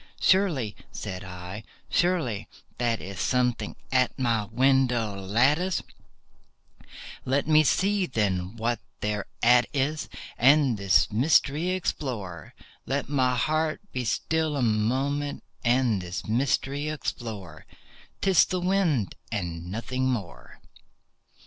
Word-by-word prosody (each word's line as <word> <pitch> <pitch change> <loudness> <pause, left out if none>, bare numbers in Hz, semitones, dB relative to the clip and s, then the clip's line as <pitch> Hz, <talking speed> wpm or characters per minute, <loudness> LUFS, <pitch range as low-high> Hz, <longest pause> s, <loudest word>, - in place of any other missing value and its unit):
"Surely," 160 - +2 0.2
said 95 +1 -6
I, 90 +3 -8 0.2
"surely 165 - 0 0.3
that 115 -2 +1
is 95 0 -7
something 125 -2 0 0.2
at 130 -1 +2
my 115 -4 +1
window 125 -1 +2
lattice; 130 - +1 1.4
Let 135 +3 0
me 155 0 +6
see, 195 +4 +2
then, 95 -4 -1
what 115 +1 -1 0.2
thereat 115 +3 +2
is, 145 +3 -1 0.3
and 135 0 +5
this 100 -2 +3
mystery 150 +7 +3
explore— 120 - -3 0.3
Let 140 +1 -1
my 130 -3 +2
heart 155 +3 0
be 125 - -2
still 155 +5 0
a 130 - 0
moment, 130 +6 0 0.2
and 120 -4 +2
this 90 +1 -5
mystery 135 +5 0
explore;— 105 - -6 0.5
'Tis 190 -3 +5
the 185 - -2
wind 175 - +1 0.2
and 85 -4 -4
nothing 130 +4 -2
more." 110 -9 -5
125 Hz, 110 wpm, -26 LUFS, 105-145 Hz, 1.4 s, me